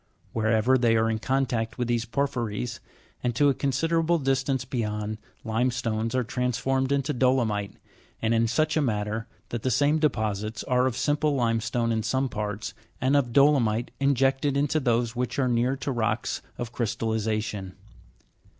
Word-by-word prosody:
Wherever 110 +3 +3
they 115 -2 +3
are 115 0 +2
in 110 - -1
contact 120 -2 -1
with 125 -2 -1
these 120 -1 0
porphyries, 120 -3 -2 0.4
and 120 -2 0
to 145 +4 +4
a - - +3
con 140 +2 -1
siderable 165 +3 +1
distance 135 -1 0
beyond, 105 -3 -3 0.3
limestones 115 -1 0
are 130 - +2
transformed 125 +3 -1
into 140 +1 +1
dolomite, 120 -6 +1 0.5
and 115 +1 +1
in 115 0 +3
such 155 +7 +1
a 155 - +3
manner 110 -2 -1 0.2
that 120 - -3
the 130 - 0
same 145 +5 +3
deposits 110 -7 -1
are 125 0 +2
of 125 -2 -2
simple 145 +1 +1
limestone 115 -1 0
in 110 -1 +1
some 130 +5 0
part?, 105 -2 -4 0.3
and 130 +3 +2
of 130 -4 +2
dolomite 120 -4 +3
injected 135 +1 +2
into 145 +2 +1
those 120 -3 +1
which 125 0 -2
are 135 -2 +2
near 125 +2 +1
to 135 +1 -3
rocks 115 -4 -1 0.2
of 120 0 -5
crystalliza 110 -1 -1
tion. 95 -4 -6
120 Hz, 160 wpm, -26 LUFS, 110-135 Hz, 0.5 s, to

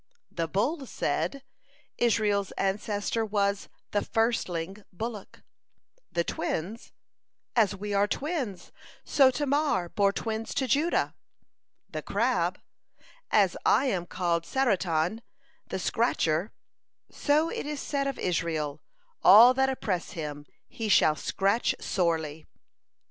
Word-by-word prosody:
The 165 -1 -2
Bull 250 - -1
said: 275 +3 -2 0.6
"Israel's 210 -4 +2
ancestor 205 +3 -1
was 200 -2 0 0.2
'the 205 - +1
firstling 195 -6 -1
bullock.'" 215 +2 -7 0.7
The 170 - +1
Twins: 190 +7 -4 0.6
"As 210 -4 +3
we 205 +1 -5
are 200 +1 +3
twins, 270 - -3 0.3
so 270 -2 +5
Tamar 280 - 0
bore 200 +1 +2
twins 220 +2 -4
to 265 - 0
Judah." 295 +8 +1 0.7
The - - -5
Crab: - - 0 0.7
"As - - +3
I - - +4
am 175 -2 -2
called 170 -2 0
Saratan, 190 -5 0 0.5
the - - -3
scratcher, 185 -4 0 0.6
so 305 +3 +2
it - - -4
is 300 -1 -4
said 275 -1 -1
of 275 - -3
Israel, 160 -4 -2 0.4
'All 225 +7 +9
that 265 +1 +2
oppress 200 -9 -2
him, 145 -3 -6 0.2
he 225 -2 -4
shall 155 -5 +5
scratch 200 +8 0
sorely.'" 160 -4 -1
205 Hz, 115 wpm, -28 LUFS, 175-245 Hz, 0.7 s, All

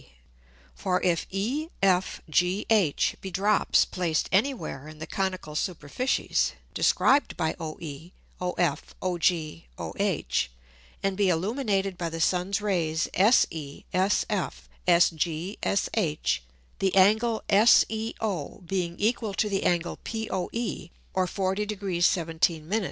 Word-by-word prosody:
For 180 - 0
if 175 -2 +1
E, 250 +12 -2
F, 185 -1 +2
G, 180 +5 +1
H, 195 -10 +3
be 190 - -5
drops 200 +3 +3
placed 170 -4 -1
any 215 +9 +4
where 155 - -7
in 155 0 -11
the 160 - -6
conical 185 -5 -3
Superficies 175 - -1 0.2
described 280 +2 +3
by 160 -2 0
OE, 160 0 -7 0.3
OF, 180 -4 -1
OG, 180 -1 +2 0.5
OH, - - -1 0.8
and 195 -1 +1
be 200 -1 +2
illuminated 195 0 0
by 170 -1 -1
the 165 0 -5
Sun's 180 +4 +1
Rays 170 -6 0
SE, 165 - +2
SF, 190 +1 +1 0.3
SG, 175 +1 +1
SH; - - +2 0.4
the 190 -1 +1
Angle 220 +4 +4
SEO 215 -5 +2
being 175 -1 -2
equal 215 -1 0
to 210 - +1
the 200 -2 -1
Angle 175 -1 +1
POE, 220 -3 -4 0.2
or 185 -1 +1
40 195 +2 -1
Degr. 195 -4 -2
17 165 -2 +1
Min. 210 +5 +1
185 Hz, 120 wpm, -27 LUFS, 170-210 Hz, 0.8 s, any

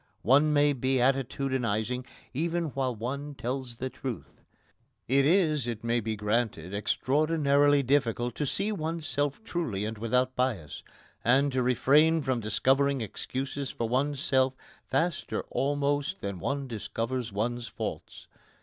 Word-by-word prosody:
One 145 +5 +5
may 145 0 +4
be 130 0 0
attitudinising 125 -2 0 0.3
even 165 +3 -1
while 130 -3 -1
one 140 +6 -4
tells 130 -1 -4
the 130 +2 -4
truth. 130 -4 -7 0.7
It 135 +2 +4
is, 155 - +3
it 115 -1 -4
may 115 +1 +1
be 110 0 -2
granted, 105 -4 -1
extraordinarily 145 +5 +2
difficult 120 -3 +1
to 150 - -1
see 200 +9 0
oneself 155 -2 -2
truly 140 - -2
and 110 0 -5
without 125 +3 +1
bias, 110 - -1 0.4
and 135 +4 +4
to 130 -1 +1
refrain 150 +6 +4
from 130 -3 0
discovering 135 +6 +2
excuses 135 +5 -4
for 115 - -3
oneself 130 0 +1 0.3
faster 170 0 -1
almost 145 +5 0
than 100 -2 -4
one 140 +8 -2
discovers 115 +1 -3
one's 120 +4 -2
faults. - - -6
130 Hz, 130 wpm, -29 LUFS, 120-145 Hz, 0.7 s, One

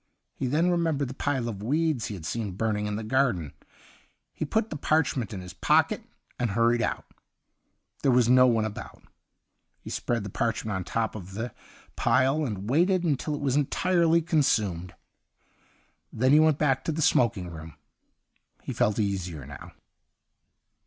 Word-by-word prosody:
He 130 - -3
then 160 +7 +2
remembered 160 -6 0
the - - -6
pile 135 -3 -1
of 105 -4 -5
weeds 150 +2 0
he 105 - -5
had 85 -4 -9
seen 105 0 -3
burning 105 +1 -1
in 105 - -2
the 110 - -4
garden, 110 - 0 0.8
He - - -3
put 220 +8 -1
the - - -3
parch 155 +1 +1
ment 120 -7 -3
in 95 -3 -6
his 90 0 -9
pocket, - - +2 0.4
and 120 -2 0
hurried 115 +3 +2
out. - - -2 1.0
There 135 - +3
was 125 -2 +4
no 125 +1 +6
one 115 -3 +2
about. 110 - -8 0.8
He - - -9
spread 120 -3 -2
the 100 - -7
parchment 110 -1 -1
on 95 - -2
the - - -9
top 115 -1 -1
of 95 -2 -9
the 115 +2 -4 0.4
pilcj 130 +5 +2
and 100 -3 -5
waited 175 - +2
until 150 -2 -1
it 145 - -6
was 135 -2 0
entirely 170 +3 +2
consumed. 110 - 0 1.2
Then 130 +3 +2
he 150 - +7
went 155 -2 +4
back 135 -4 +1
to - - 0
the 160 0 -1
smoking 105 -11 +2
room; 80 -1 -10 0.9
he - - -4
felt 105 - +1
easier 95 - -2
now. 70 0 -10
120 Hz, 170 wpm, -27 LUFS, 105-145 Hz, 1.2 s, he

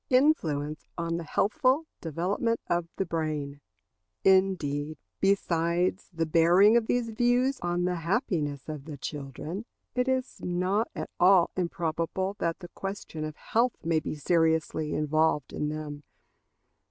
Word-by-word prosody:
Influence 160 - +2
on 170 0 -1
the 170 - -4
healthful 260 - +2 0.2
Development 185 - -1
of 175 -1 0
the 195 - -1
Brain. 155 -4 -3 0.6
Indeed, 160 -6 +2 0.2
besides 180 -1 +1
the 165 -2 -1
bearing 175 +7 +5
of 235 -2 +3
these 245 -2 +1
views 245 +4 +2
on 175 0 0
the 180 -1 0
happiness 165 - -1
of 150 -3 -6
the 155 -2 -7
children, 150 - -5 0.3
it 250 0 0
is 260 0 -1
not 185 +5 0
at - - -5
all 180 -1 +6
improbable 175 +2 -1
that 170 +2 -1
the 175 - -8
question 195 -5 -6
of 155 -1 -5
health 235 +8 +1
may 165 -1 +3
be 155 - -4
seriously 160 -1 +1
involved 155 -1 +1
in 150 - -1
them. 150 -1 -5
170 Hz, 135 wpm, -28 LUFS, 155-200 Hz, 0.6 s, all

